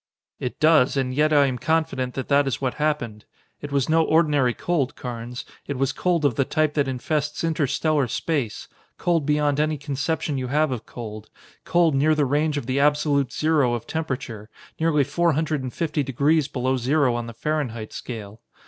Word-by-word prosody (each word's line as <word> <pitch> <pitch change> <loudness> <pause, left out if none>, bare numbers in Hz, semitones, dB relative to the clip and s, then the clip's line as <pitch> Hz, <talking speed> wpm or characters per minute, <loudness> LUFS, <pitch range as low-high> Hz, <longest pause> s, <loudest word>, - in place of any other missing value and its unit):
"It 125 - -4
does, 155 -4 +4
and 130 -1 0
yet 150 +3 +2
I 145 -2 +5
am 130 -2 -2
confident 155 -6 0
that 130 - -4
that 140 0 +3
is 135 - -1
what 130 -2 -1
happened. 120 -9 -1 0.4
It 145 - -6
was 140 -3 +1
no 160 +1 +4
ordinary 150 -7 +3
cold, 155 -7 -1
Carnes; 120 0 -6 0.2
it 140 - -3
was 135 0 +1
cold 175 -4 0
of 140 - +3
the 135 - +1
type 155 +2 0
that 145 -2 +1
infests 150 +4 -2
interstellar 155 -2 +1
space; 125 -1 -2 0.3
cold 165 -4 0
beyond 150 -1 +2
any 155 0 +1
conception 145 +1 -2
you 130 - -3
have 150 +2 +1
of 115 -3 -5
cold, 110 -3 -8 0.4
cold 170 -3 +3
near 150 +3 +3
the 150 -1 +2
range 150 +2 +1
of 140 - -3
the 130 +2 0
absolute 145 -2 +2
zero 150 -6 +2
of 120 - -6
temperature, 130 -9 -4 0.3
nearly 160 -3 +3
four 170 +4 +1
hundred 155 -1 -1
and 130 -1 -5
fifty 155 0 -1
degrees 140 +3 +2
below 130 -1 -1
zero 130 +1 +2
on 120 0 -3
the 115 - -7
Fahrenheit 125 -7 -3
scale. 110 -3 -7
140 Hz, 185 wpm, -24 LUFS, 125-155 Hz, 0.4 s, I